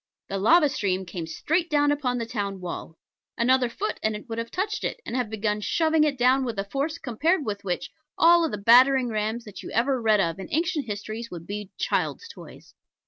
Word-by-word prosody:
The 195 - -2
lava 300 - +5
stream 190 -8 -1
came 170 -2 -6
straight 325 - -1
down 290 -2 +3
upon 265 -4 -1
the 230 - -2
town 205 -4 -4
wall. 175 -2 -7 0.4
Another 250 +1 +3
foot, 405 - -4
and 220 0 0
it 210 - -9
would 225 -1 -4
have 230 0 -4
touched 410 +4 -2
it, - - -3
and - - -5
have 250 -4 -1
begun 210 -1 -1
shoving 315 +6 +2
it 295 -3 +1
down 255 +2 +3
with 235 -4 -4
a 195 - 0
force 280 +10 -3
compared 305 - 0
with 205 -2 -4
which 180 -2 -3 0.3
all 335 -1 +5
the 210 - -4
battering 250 +4 +5
rams 220 +2 -2
that 210 - -9
you - - -8
ever 255 +2 +1
read 215 -2 +3
of 170 -1 0
in 190 - -6
ancient 320 -3 -1
histories 215 +2 -5
would 170 -2 -8
be 205 0 -6
child's 460 - -1
toys. 465 - -13
235 Hz, 210 wpm, -25 LUFS, 210-290 Hz, 0.4 s, lava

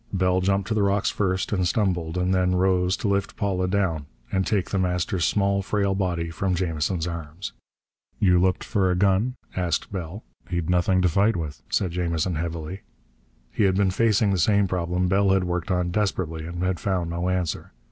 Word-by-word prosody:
Bell 95 -1 +2
jumped 100 0 +1
to - - +1
the 110 - +1
rocks 100 0 +2
first, 95 -2 -1
and 95 -3 +1
stumbled, 90 -4 0
and 90 +1 +1
then 90 0 +2
rose 90 0 +2
to - - -2
lift 100 0 -1
Paula 95 -3 0
down 90 -6 0 0.2
and 95 0 0
take 100 -5 0
The 95 - +1
Master's 90 -1 0
small, 100 -1 +1
frail 100 0 0
body 90 -4 -1
from 90 +2 -1
Jamison's 85 -1 -1
arms. 85 +1 -6 0.7
"You 90 -3 +4
looked 90 0 +1
for 95 -2 +1
a 90 - +2
gun?" 100 +6 +2 0.2
asked 90 -3 -1
Bell 95 +2 -6 0.3
"He'd 85 -2 -1
nothing 90 +1 +2
to - - +5
fight 100 +6 +2
with," 80 -4 -5
said 95 -4 0
Jamison 85 0 -1
heavily. 85 +3 -4 0.7
He 105 - +1
had 95 -1 +3
been 95 -1 +2
facing 105 0 +2
the 95 - +1
same 100 +3 +3
problem 90 0 -1
Bell 100 +1 +3
had 95 -1 +2
worked 90 +2 -2
on 90 -1 0
desperately, 85 -5 -1
and 85 +1 -4
had 90 -1 0
found 90 -4 -1
no 85 +2 -1
answer. 90 -3 -2
90 Hz, 190 wpm, -24 LUFS, 85-100 Hz, 0.7 s, to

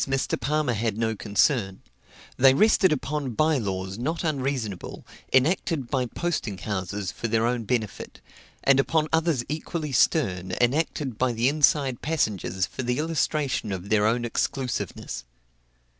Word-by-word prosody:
With - - 0
some 135 - -3
of - - +3
these - - -1
Mr. - - -2
Palmer 150 -3 +1
had 110 -1 -1
no 110 -1 0
concern; 100 0 +1 0.5
they 135 +1 +6
rested 210 +1 +4
upon 145 -3 -2
bye 155 0 +3
laws 95 -1 -4
not 160 +8 -2
unreasonable, 135 - -3 0.3
enacted 140 -1 +1
by 130 -2 +1
posting 120 - -3
houses 95 0 -3
for 115 - -4
their 115 0 +1
own 120 -1 -1
benefit, 110 -4 -3 0.4
and 135 -1 +5
upon 155 +2 +2
others 160 -6 +2
equally 155 0 -4
stern, 95 - +1
enacted 135 -1 0
by 130 -1 +2
the 115 +2 +1
inside 140 -3 +2
passengers 100 - -1
for - - -6
the 125 0 -1
illustration 150 -7 -1
of 95 +1 -5
their 105 -1 +3
own 120 +2 +1
exclusiveness. 125 - -3
125 Hz, 155 wpm, -25 LUFS, 110-150 Hz, 0.5 s, they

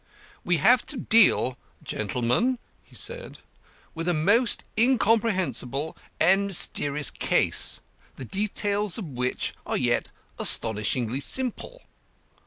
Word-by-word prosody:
"We 175 -1 +1
have 245 - +4
to 295 - -2
deal, 210 - +3 0.2
gentlemen," 125 - -1 0.3
he - - -21
said, - - -3 0.6
"with 165 +1 -6
a 175 - +1
most 210 +9 +2
incomprehensible 205 - 0 0.2
and 195 +4 +3
mysterious 150 -6 +3
case, - - 0 0.3
the 130 - -9
details 205 - -1
of 215 - -6
which 125 -4 -3
are - - -3
yet - - 0 0.3
astonishingly 115 +3 +1
simple. 260 - -2
185 Hz, 105 wpm, -25 LUFS, -, 0.6 s, have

